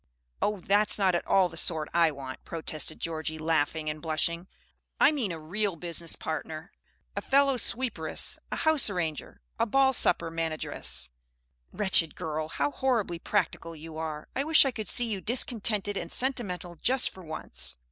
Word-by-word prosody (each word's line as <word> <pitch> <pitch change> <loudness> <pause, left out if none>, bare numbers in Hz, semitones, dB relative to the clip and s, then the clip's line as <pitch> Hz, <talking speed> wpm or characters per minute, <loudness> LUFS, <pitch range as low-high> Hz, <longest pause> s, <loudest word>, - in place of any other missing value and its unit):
"Oh, 210 0 +1
that's 205 +3 +3
not 190 -3 +3
at 175 - -1
all 190 -2 +4
the 165 - -11
sort 160 -2 +1
I 170 -1 +4
want," 135 -3 -8
protested 160 -1 -2
Georgie, 160 -1 -3
laughing 155 0 0
and 150 0 -3
blushing. 170 +2 -1 0.5
"I - - +6
mean 255 -11 -2
a 165 - -5
real 190 +5 -2
business 170 -1 -3
partner, 160 +2 -5 0.4
a - - -2
fellow 275 0 +3
sweeperess 250 0 -1
and - - -3
house 315 -7 +4
arranger 165 -6 -4 0.2
and 230 0 +1
ball 270 +2 +4
supper 170 -7 +3
manageress!" 160 - -2 0.6
"Wretched 185 -6 +3
girl, 155 -3 -3
how 145 -2 -1
horribly 220 - 0
practical 165 0 -1
you 160 +1 -10
are! 155 -1 -5
I 270 - 0
wish 310 -1 +6
I 270 - +1
could 215 -4 -6
see 245 - +4
you 210 -4 -3
discontented 215 -4 +1
and 170 - -4
sentimental 185 -10 +1
just 255 +8 +1
for 190 - -13
once!" 155 - 0
170 Hz, 165 wpm, -28 LUFS, 160-215 Hz, 0.6 s, I